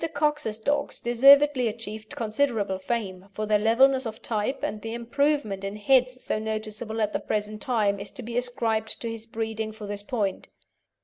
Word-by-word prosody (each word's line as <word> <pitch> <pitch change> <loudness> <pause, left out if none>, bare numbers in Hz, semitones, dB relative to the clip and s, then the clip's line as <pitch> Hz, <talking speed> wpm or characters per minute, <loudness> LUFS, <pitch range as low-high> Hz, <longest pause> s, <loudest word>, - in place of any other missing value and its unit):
Cox's 295 -7 +1
dogs 285 +6 0
deservedly 275 +2 +6
achieved 215 -1 -7
considerable 220 -4 0
fame 195 -3 -3
for 215 - -3
their 210 0 +3
levelness 260 +4 +4
of 220 0 -7
type, 220 +4 -2
and 210 - -3
the 225 +1 -5
improvement 240 -4 0
in 195 +1 -4
heads 255 +3 +2
so - - -1
noticeable 220 +1 -3
at 210 -1 0
the - - 0
present 210 0 -3
time 210 -5 +1
is 200 - -4
to 250 - -7
be 235 +1 -6
ascribed 230 -3 0
to 230 - -3
his 225 0 -7
breeding 220 -1 -3
for 215 -1 -9
this 205 0 -4
point. 205 -3 -2
220 Hz, 175 wpm, -26 LUFS, 210-245 Hz, -, deservedly